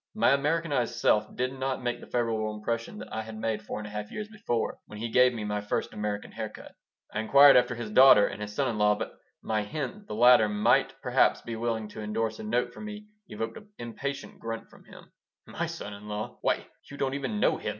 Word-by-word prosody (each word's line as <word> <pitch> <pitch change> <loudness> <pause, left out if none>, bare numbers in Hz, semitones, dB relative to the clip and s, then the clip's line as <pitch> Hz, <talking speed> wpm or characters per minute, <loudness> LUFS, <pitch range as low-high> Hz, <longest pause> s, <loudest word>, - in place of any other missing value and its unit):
My 215 - +4
Americanized 145 -3 +1
self 105 0 +2
did 130 +1 -1
not 130 -1 -3
make 120 0 -1
the - - -12
favorable 110 -3 -1
impression 115 - -3
that - - -9
I 110 - -2
had 110 0 -8
made 110 -1 -2
four 105 - -6
and 105 - -6
a 105 - -8
half 105 0 -5
years 210 0 -5
before, 205 - -2
when 105 - -10
he 115 +2 -4
gave 125 +1 +6
me 115 -3 -5
my 105 0 -2
first 105 - -2
American 105 -1 -4
hair - - -4
cut - - -13 0.4
I - - -1
inquired 140 +6 +7
after 125 0 +4
his 115 -2 -6
daughter 130 -3 +8
and - - -5
his 105 0 -5
son - - +1
in 110 -3 -2
law, 105 0 +4
but - - -5 0.3
my 110 -1 0
hint 130 - -4
that 205 +1 -17
the - - -5
latter 120 -1 +6
might 105 0 +2
perhaps - - +3
be 115 - -5
willing 115 -1 -2
to 110 - -8
indorse 110 +1 -2
a - - -6
note 120 +3 0
for - - -10
me 210 0 -8 0.2
evoked 115 +1 -5
an 210 - -13
impatient 135 +4 -6
grunt 115 0 -5 0.8
"My - - -3
son 100 - -6
in 100 +1 -11
law! 105 +3 -5
Why, - - 0 0.2
you 140 - -9
don't 135 -1 -1
even 140 +10 -2
know - - +3
him!" - - -4
115 Hz, 230 wpm, -28 LUFS, 105-135 Hz, 0.8 s, daughter